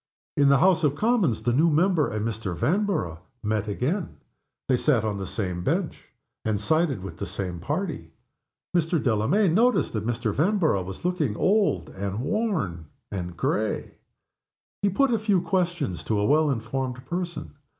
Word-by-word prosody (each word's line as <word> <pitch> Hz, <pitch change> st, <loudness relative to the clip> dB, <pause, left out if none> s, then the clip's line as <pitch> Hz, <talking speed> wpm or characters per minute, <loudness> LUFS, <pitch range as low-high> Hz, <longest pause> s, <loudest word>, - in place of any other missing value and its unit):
In 140 Hz, -1 st, +4 dB
the 140 Hz, -, +6 dB
House 180 Hz, +3 st, +4 dB
of 145 Hz, -2 st, +2 dB
Commons 190 Hz, -, +1 dB
the 120 Hz, +1 st, +1 dB
new 160 Hz, +7 st, +4 dB
member 165 Hz, 0 st, +3 dB
and 110 Hz, +1 st, -2 dB
Mr. 105 Hz, -5 st, -3 dB
Vanborough 160 Hz, -, 0 dB, 0.2 s
met 110 Hz, -1 st, -1 dB
again. 150 Hz, -, -2 dB, 0.5 s
They 130 Hz, -, +3 dB
sat 125 Hz, -5 st, +2 dB
on 105 Hz, -2 st, -2 dB
the 95 Hz, -, -4 dB
same 90 Hz, -3 st, -3 dB
bench, -, -, -2 dB, 0.4 s
and 110 Hz, -2 st, 0 dB
sided 150 Hz, -, +1 dB
with 90 Hz, -3 st, -7 dB
the -, -, -4 dB
same 90 Hz, -2 st, -4 dB
party. 145 Hz, -, -3 dB, 0.7 s
Mr. 170 Hz, 0 st, +2 dB
Delamayn 140 Hz, -, +2 dB
noticed 240 Hz, +6 st, +3 dB
that 110 Hz, -2 st, -2 dB
Mr. 120 Hz, -3 st, -1 dB
Vanborough 160 Hz, -, +2 dB
was 95 Hz, -, -8 dB
looking 160 Hz, -, 0 dB
old 205 Hz, +1 st, +2 dB
and 100 Hz, +2 st, -4 dB
worn 145 Hz, -, -1 dB, 0.2 s
and 90 Hz, -3 st, -5 dB
gray. 110 Hz, +4 st, -1 dB, 0.8 s
He 200 Hz, -, +3 dB
put 245 Hz, +6 st, +2 dB
a 225 Hz, -, +2 dB
few 205 Hz, -3 st, +2 dB
questions 175 Hz, -, -1 dB
to 110 Hz, -, 0 dB
a 105 Hz, -, +1 dB
well 150 Hz, +4 st, +4 dB
informed 125 Hz, +1 st, -3 dB
person. 175 Hz, +2 st, -4 dB
135 Hz, 160 wpm, -25 LUFS, -, 0.8 s, the